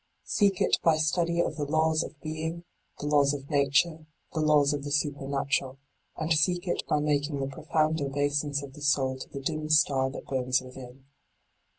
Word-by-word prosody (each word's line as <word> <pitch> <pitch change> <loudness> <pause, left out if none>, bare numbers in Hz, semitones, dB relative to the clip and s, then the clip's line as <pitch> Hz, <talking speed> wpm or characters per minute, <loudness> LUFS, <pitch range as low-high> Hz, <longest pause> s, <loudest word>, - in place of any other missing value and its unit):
Seek 200 -3 +2
it - - +3
by 160 -2 +4
study 170 +2 +1
of - - -2
the 150 - -2
laws 160 +1 +2
of 155 - -7
being, 160 +2 -4 0.4
the - - -5
laws 145 -1 +3
of 140 +2 -9
nature, 150 +3 +2 0.3
the 160 - -2
laws 150 -2 +4
of 145 -1 -3
the 145 - -5
supernatural: 140 -2 -1 0.4
and 160 +1 +1
seek 175 +4 +1
it - - 0
by 150 - +2
making 145 -1 0
the 135 - -1
profound 155 +3 -1
obeisance 145 +1 -1
of 135 -1 -10
the 150 - -12
soul 135 -2 +1
to - - -8
the 140 - -7
dim 155 +2 -3
star 140 -4 +3
that 135 - -8
burns 130 -1 0
within. 130 0 -12
145 Hz, 185 wpm, -28 LUFS, 140-155 Hz, 0.4 s, by